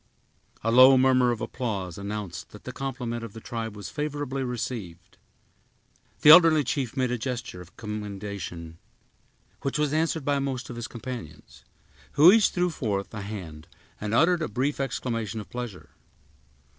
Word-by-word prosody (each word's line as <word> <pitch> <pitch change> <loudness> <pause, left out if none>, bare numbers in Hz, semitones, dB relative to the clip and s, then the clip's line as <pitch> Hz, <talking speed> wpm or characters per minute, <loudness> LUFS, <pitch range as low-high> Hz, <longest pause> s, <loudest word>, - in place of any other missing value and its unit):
A 115 - +1
low 130 +2 +8
murmur 130 -1 +4
of 120 -1 -2
applause 105 -7 -3
announced 100 -3 -5
that 105 - -14
the 130 - -6
compliment 125 -3 -4
of 115 -3 -8
the 110 - -8
tribe 110 -1 -5
was 105 - -7
favorably 145 -3 -3
received. 110 -9 -6 1.0
The 150 - +9
elderly 160 -3 +8
chief 135 -1 -2
made 130 -2 +1
a 125 - -1
gesture 120 -7 -4
of 90 0 -15
commendation, 100 -6 -6 0.8
which 140 +1 -2
was 150 -1 0
answered 160 -2 0
by 145 -1 +1
most 135 -2 -3
of - - -7
his 120 0 -5
companions, 115 - -9 0.5
who 160 +5 +8
each 220 -1 +5
threw 180 -1 0
forth 105 -10 -3
a 105 - -5
hand 85 -6 -8 0.3
and 105 0 -3
uttered 170 +5 +4
a 155 - 0
brief 135 +7 -1
exclamation 115 -5 -3
of 105 - -10
pleasure. 120 -7 -7
120 Hz, 155 wpm, -26 LUFS, 105-135 Hz, 1.0 s, The